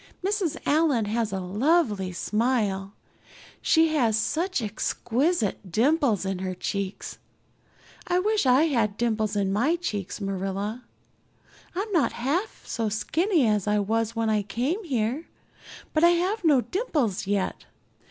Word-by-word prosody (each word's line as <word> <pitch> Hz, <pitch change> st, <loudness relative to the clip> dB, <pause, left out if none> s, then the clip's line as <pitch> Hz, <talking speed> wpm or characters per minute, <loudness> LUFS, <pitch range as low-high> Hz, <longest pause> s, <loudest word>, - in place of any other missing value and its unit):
Mrs. 390 Hz, -5 st, 0 dB
Allan 290 Hz, -7 st, +2 dB
has 220 Hz, 0 st, -1 dB
a 190 Hz, -, -2 dB
lovely 210 Hz, -, +1 dB
smile; 210 Hz, -1 st, -1 dB, 0.7 s
she 320 Hz, 0 st, +4 dB
has 235 Hz, -8 st, +2 dB
such 340 Hz, +10 st, 0 dB
exquisite 225 Hz, -, -1 dB
dimples 240 Hz, -, +2 dB
in 190 Hz, -1 st, -2 dB
her 185 Hz, -1 st, -3 dB
cheeks. 195 Hz, +1 st, -4 dB, 0.9 s
I 355 Hz, -, +2 dB
wish 415 Hz, -4 st, +1 dB
I 255 Hz, +4 st, +5 dB
had 230 Hz, -10 st, +1 dB
dimples 220 Hz, -3 st, 0 dB
in 195 Hz, -1 st, 0 dB
my 265 Hz, +11 st, +2 dB
cheeks, 210 Hz, -, -4 dB
Marilla. 195 Hz, +4 st, -3 dB, 0.9 s
I'm 405 Hz, +4 st, -3 dB
not 335 Hz, -7 st, +2 dB
half 305 Hz, -, -2 dB
so 225 Hz, -3 st, -2 dB
skinny 315 Hz, -, +1 dB
as 210 Hz, -2 st, +1 dB
I 210 Hz, 0 st, +2 dB
was 225 Hz, +2 st, 0 dB
when 225 Hz, 0 st, 0 dB
I 210 Hz, -1 st, +2 dB
came 250 Hz, -, -2 dB
here, 260 Hz, -, -1 dB, 0.7 s
but 310 Hz, -, +2 dB
I 340 Hz, -, +8 dB
have 365 Hz, +5 st, +1 dB
no 295 Hz, -6 st, +5 dB
dimples 245 Hz, -, -1 dB
yet. 200 Hz, -1 st, -1 dB
230 Hz, 135 wpm, -26 LUFS, 205-320 Hz, 0.9 s, I